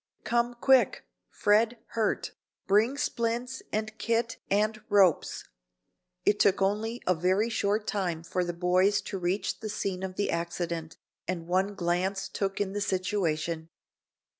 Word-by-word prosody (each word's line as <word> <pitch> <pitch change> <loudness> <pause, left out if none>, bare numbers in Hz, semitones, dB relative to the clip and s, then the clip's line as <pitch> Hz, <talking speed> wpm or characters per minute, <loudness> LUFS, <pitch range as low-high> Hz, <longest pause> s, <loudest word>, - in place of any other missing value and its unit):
"Come 240 0 +1
quick! 260 +1 +3 0.2
Fred 225 +3 +2
hurt. 220 -2 -1 0.3
Bring 220 +7 +3
splints 240 0 -2
and 215 +1 -2
kit 230 0 0
and 215 +2 +1
ropes." 195 -6 +3 0.8
It 205 - +3
took 195 - +4
only 215 +5 0
a 180 - +4
very 185 +6 +1
short 210 0 0
time 180 -7 -2
for 180 +2 -1
the 175 - -2
boys 180 +4 +3
to 195 - -5
reach 185 +3 -1
the 220 -1 -5
scene 195 -3 -3
of 190 -1 -4
the 205 - 0
accident, 170 -1 -3 0.3
and 175 -2 -3
one 190 +4 0
glance 190 +2 0
took 195 -1 -2
in 200 -1 -1
the 205 - -2
situation. 170 -5 -1
200 Hz, 140 wpm, -29 LUFS, 180-220 Hz, 0.8 s, took